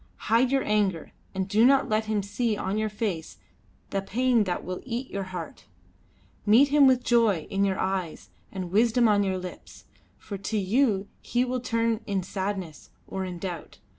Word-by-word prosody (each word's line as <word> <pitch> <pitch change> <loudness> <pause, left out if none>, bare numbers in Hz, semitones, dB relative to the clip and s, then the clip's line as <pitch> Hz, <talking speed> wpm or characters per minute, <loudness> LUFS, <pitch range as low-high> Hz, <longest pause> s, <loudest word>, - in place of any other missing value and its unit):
Hide 240 +3 +4
your 270 -1 +2
anger, 200 -6 0 0.2
and 190 0 -1
do 215 +3 +3
not 270 +2 +5
let 215 +1 0
him 215 -2 -1
see 215 +2 -1
on 200 +2 -2
your 215 0 0
face 200 -6 -4 0.5
the 195 - 0
pain 235 +2 +2
that 180 -2 -2
will 185 0 -5
eat 250 +1 -4
your 195 -1 -3
heart. 180 -3 -8 0.8
Meet 235 +7 +5
him 285 -1 +6
with 255 -1 +3
joy 225 -10 +3
in 195 0 +1
your 195 -1 +1
eyes 175 - -3 0.2
and 185 -3 -5
wisdom 230 +3 +4
on 205 -1 +4
your 190 -1 -1
lips, 180 -1 -9 0.3
for 200 -2 -7
to 215 +3 -2
you 205 0 +1
he 245 +2 0
will 255 0 -2
turn 230 -2 0
in 195 -3 -1
sadness 190 -4 -5 0.2
or 190 0 -4
in 180 -1 -6
doubt. 175 -2 -6
205 Hz, 180 wpm, -26 LUFS, 190-235 Hz, 0.8 s, him